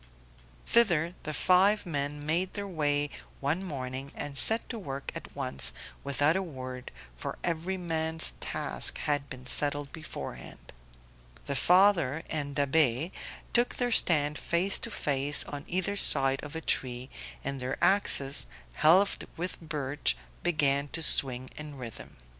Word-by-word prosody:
Thither 175 -8 +3
the 155 - -4
five 185 +7 +3
men 145 -2 -3
made 175 +4 0
their 200 -1 -3
way 145 -4 0 0.3
one 150 +7 -1
morning 135 -4 -5
and 145 -1 -4
set 225 +10 +1
to 230 - -5
work 140 -7 -6
at - - -9
once, 65 -2 +1 0.3
without 145 +3 +1
a 190 - +1
word, 130 -7 -7 0.3
for - - -6
every 175 +3 -2
man's 160 -2 0
task - - -1
had 145 -1 -1
been 130 -1 -9
settled 145 +2 +1
beforehand. 155 -1 -9 0.7
The 140 - -3
father 170 -4 +4
and 145 -2 -3
Da'Be 145 +1 +2 0.4
took 240 +1 +3
their 245 -1 -1
stand 150 -8 +3
face 180 +3 +1
to - - -4
face 145 -6 +2
on 145 -1 -7
either 185 +3 -1
side 135 -7 +5
of 150 +1 -8
a 160 - -3
tree, 125 -3 -2 0.3
and 140 0 -3
their 130 +1 -3
axes, 145 -8 +3 0.3
helved 180 - +3
with 180 +2 -4
birch, 145 - -1 0.2
began 145 -4 +2
to 165 - +2
swing 130 -3 +3
in 150 -2 -8
rhythm. 120 - -9
150 Hz, 140 wpm, -29 LUFS, 140-175 Hz, 0.7 s, side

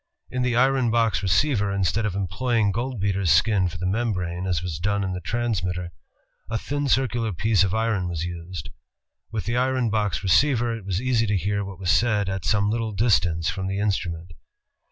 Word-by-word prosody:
In 125 - -2
the 125 -1 +1
iron 130 -1 +3
box 115 -7 +2
receiver, 105 0 +2
instead 100 +3 0
of 95 - -3
employ 115 +6 -1
ing 105 -3 +3
goldbeater's 100 -6 -1
skin 95 +2 +3
for 85 0 -6
the 90 - -4
mem 110 +4 0
brane, 90 0 -3
as 85 -2 0
was 85 -4 -4
done 100 +2 0
in 95 -1 -2
the 90 - -5
transmitter, 90 -4 -2 0.6
a 110 - -1
thin 145 +4 -2
circular 120 -4 +1
piece 105 +3 +2
of 95 +1 0
iron 110 -5 0
was 85 -2 -3
used. 85 -1 -6 0.6
With 110 -5 -3
the 120 +1 -1
iron 130 -2 +1
box 100 -8 0
receiver, 120 +3 +3
it 110 -4 -9
was 95 -1 -1
easy 120 -2 +1
to 105 -1 +1
hear 100 +2 -1
what 95 -2 -8
was 90 -1 0
said 105 -4 +2
at 95 -1 -4
some 105 -1 +2
little 115 -1 -2
distance 90 -7 +2
from 95 +3 -4
the 95 +1 -2
instrument. 85 -4 -2
100 Hz, 195 wpm, -24 LUFS, 90-115 Hz, 0.6 s, iron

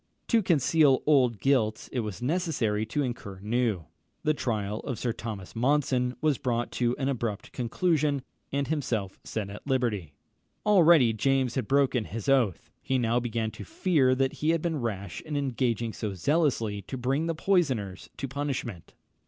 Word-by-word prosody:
To 230 -2 +4
conceal 155 -5 +3
old 130 -7 +4
guilt 115 -5 +1
it 130 - -1
was 110 0 -4
necessary 125 - 0
to 145 +6 -1
incur 110 -7 -5
new: 110 -4 0 0.4
the 155 - +3
trial 105 -6 -2
of 130 -5 -4
Sir 120 -2 -1
Thomas 105 -5 -7
Monson 125 0 +1
was 150 -4 +2
brought 120 -1 -1
to 120 0 0
an 135 - -1
abrupt 115 -6 -3
conclusion, 145 +2 0 0.3
and 140 0 0
himself 125 -11 -2
set 105 -3 -4
at 105 - -10
liberty. 115 - 0 0.5
Already 170 - +6
James 130 +2 +1
had 130 -6 -2
broken 135 -4 +2
his 110 -1 -6
oath. 125 -10 +2
He 135 - 0
now 120 -1 +2
began 115 -2 -2
to - - -9
fear 165 - +2
that 135 0 +1
he 155 - +2
had 165 -1 +2
been 160 -5 -1
rash 100 -6 -4
in 150 -2 -4
engaging 120 -4 -1
so 105 -4 -4
zealously 115 - +1
to 130 +7 -6
bring 135 +6 0
the 165 - -1
poisoners 135 - 0
to 135 - -3
punishment. 135 - -4
125 Hz, 165 wpm, -28 LUFS, 110-145 Hz, 0.5 s, Already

